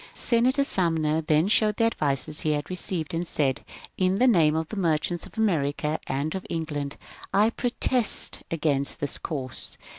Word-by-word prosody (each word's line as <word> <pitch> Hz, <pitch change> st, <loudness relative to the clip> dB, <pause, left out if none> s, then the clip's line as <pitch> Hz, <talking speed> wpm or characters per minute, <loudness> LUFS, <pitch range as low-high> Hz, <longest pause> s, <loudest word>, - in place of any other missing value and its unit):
Senator 255 Hz, +4 st, +2 dB
Sumner 160 Hz, -, 0 dB
then 155 Hz, +2 st, +2 dB
showed 210 Hz, 0 st, +3 dB
the -, -, +2 dB
advices 150 Hz, -, 0 dB
he 155 Hz, -, +1 dB
had 145 Hz, +3 st, -4 dB
received, 175 Hz, -3 st, -2 dB
and 170 Hz, +1 st, -2 dB
said, 135 Hz, -5 st, 0 dB, 0.4 s
In 185 Hz, 0 st, +2 dB
the 245 Hz, +6 st, +3 dB
name 165 Hz, -11 st, +4 dB
of 160 Hz, 0 st, -2 dB
the -, -, -6 dB
merchants 170 Hz, -2 st, 0 dB
of -, -, -19 dB
America 155 Hz, -7 st, 0 dB
and 140 Hz, +4 st, -2 dB
of 190 Hz, -, -4 dB
England 150 Hz, -4 st, -4 dB, 0.3 s
I 210 Hz, +3 st, +3 dB
protest 245 Hz, -1 st, +2 dB
against 150 Hz, -4 st, -1 dB
this 145 Hz, -, -1 dB
course." 135 Hz, -6 st, -5 dB
160 Hz, 160 wpm, -26 LUFS, 150-200 Hz, 0.4 s, name